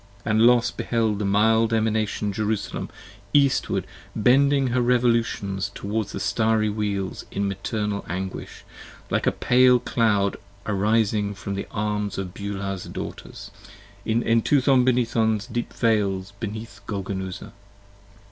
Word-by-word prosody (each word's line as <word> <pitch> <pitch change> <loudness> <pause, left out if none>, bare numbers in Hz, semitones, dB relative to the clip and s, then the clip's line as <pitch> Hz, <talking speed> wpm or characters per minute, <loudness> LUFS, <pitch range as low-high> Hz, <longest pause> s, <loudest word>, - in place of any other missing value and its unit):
And 110 -1 +2
Los 120 -1 +4
beheld 110 -3 -1
the 105 - -1
mild 110 +3 +3
Emanation 110 -2 0
Jerusalem 105 0 -2 0.5
eastward 140 -2 +2 0.3
bending 135 +4 +3
Her 125 +1 +1
revolutions 115 -5 +1
toward 105 +1 -2
the - - -6
Starry 110 -2 +1
Wheels 100 -2 -3
in 100 0 -2
maternal 100 +1 -3
anguish, 95 +2 -5 0.5
Like - - 0
a - - +5
pale 125 0 +4
cloud 110 -5 +1 0.3
arising 105 0 +1
from 100 0 -5
the 100 - -4
arms 105 -1 -2
of 95 -2 -4
Beulah's 100 -2 -4
Daughters: - - -8 0.5
34 - - -1
In 115 +2 +2
Entuthon 130 +3 +3
Benython's 115 -4 +1
deep 120 +2 -4
Vales 100 -4 0
beneath 110 -1 -6
Golgonooza. 95 -2 -5
110 Hz, 120 wpm, -24 LUFS, 100-115 Hz, 0.5 s, a